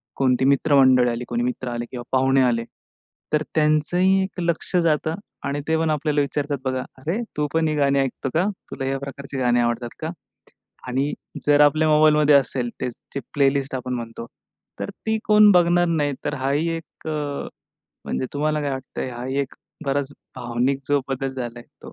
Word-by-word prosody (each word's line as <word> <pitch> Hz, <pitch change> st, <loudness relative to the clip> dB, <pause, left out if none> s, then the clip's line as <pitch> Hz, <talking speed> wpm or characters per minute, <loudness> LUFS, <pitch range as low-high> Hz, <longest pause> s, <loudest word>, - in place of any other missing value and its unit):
कोणती 130 Hz, -1 st, +2 dB
मित्रमंडळी 135 Hz, -3 st, +5 dB
आली, 120 Hz, +1 st, -3 dB
कोणी 120 Hz, 0 st, -1 dB
मित्र 125 Hz, +1 st, -3 dB
आले 120 Hz, 0 st, -3 dB
किंवा 125 Hz, -2 st, -6 dB
पाहुणे 135 Hz, 0 st, +3 dB
आले, 120 Hz, -2 st, +2 dB, 0.7 s
तर 150 Hz, 0 st, +3 dB
त्यांचंही 175 Hz, +5 st, +3 dB
ते 175 Hz, -, -2 dB
लक्ष 170 Hz, +1 st, -1 dB
जातं 160 Hz, 0 st, +1 dB, 0.3 s
आणि 140 Hz, +1 st, -2 dB
ते 160 Hz, 0 st, +2 dB
पण 160 Hz, 0 st, +1 dB
आपल्याला 150 Hz, -1 st, +1 dB
विचारतात 145 Hz, 0 st, -1 dB
बघा, 130 Hz, 0 st, 0 dB, 0.2 s
"अरे, 160 Hz, +9 st, -2 dB, 0.2 s
तू 150 Hz, 0 st, +1 dB
पण 160 Hz, 0 st, +2 dB
ही 155 Hz, -, 0 dB
गाणी 140 Hz, -1 st, +3 dB
ऐकतो 135 Hz, 0 st, -2 dB
का? 165 Hz, -, +3 dB, 0.3 s
तुला 135 Hz, -, -4 dB
या 135 Hz, +1 st, 0 dB
प्रकारची 140 Hz, 0 st, -7 dB
गाणी 120 Hz, -2 st, +2 dB
आवडतात 120 Hz, 0 st, 0 dB
का?" 160 Hz, -, -3 dB, 0.8 s
आणि 135 Hz, +4 st, 0 dB, 0.3 s
जर 145 Hz, 0 st, +5 dB
आपल्या 155 Hz, +2 st, +5 dB
मोबाईलमध्ये 150 Hz, -1 st, +5 dB
असेल, 130 Hz, -3 st, +2 dB
तेच 125 Hz, -2 st, -4 dB
जी 140 Hz, -, -2 dB
प्लेलिस्ट 140 Hz, -1 st, +2 dB
आपण 125 Hz, 0 st, -3 dB
म्हणतो, 115 Hz, -1 st, -6 dB, 0.5 s
तर -, -, -3 dB
ती 220 Hz, 0 st, -2 dB
कोण 210 Hz, 0 st, +7 dB
बघणार 175 Hz, -1 st, +4 dB
नाही. 150 Hz, -3 st, +1 dB
तर -, -, -1 dB
हा 135 Hz, +1 st, -2 dB
ही 155 Hz, +4 st, +1 dB
एक 165 Hz, 0 st, -10 dB
अ, -, -, -1 dB, 0.9 s
म्हणजे 130 Hz, -, -2 dB
तुम्हाला 150 Hz, +1 st, 0 dB
काय 145 Hz, -1 st, -1 dB
वाटतंय? 130 Hz, -1 st, -5 dB
हा 120 Hz, 0 st, -6 dB
ही 130 Hz, +2 st, -2 dB
एक 140 Hz, -1 st, -4 dB, 0.3 s
बराच 140 Hz, 0 st, -1 dB, 0.2 s
भावनिक 125 Hz, +3 st, -1 dB
जो 145 Hz, 0 st, +3 dB
बदल 135 Hz, 0 st, -2 dB
झालाय 120 Hz, -2 st, -5 dB, 0.2 s
तो -, -, -10 dB
140 Hz, 180 wpm, -23 LUFS, 130-155 Hz, 0.9 s, कोण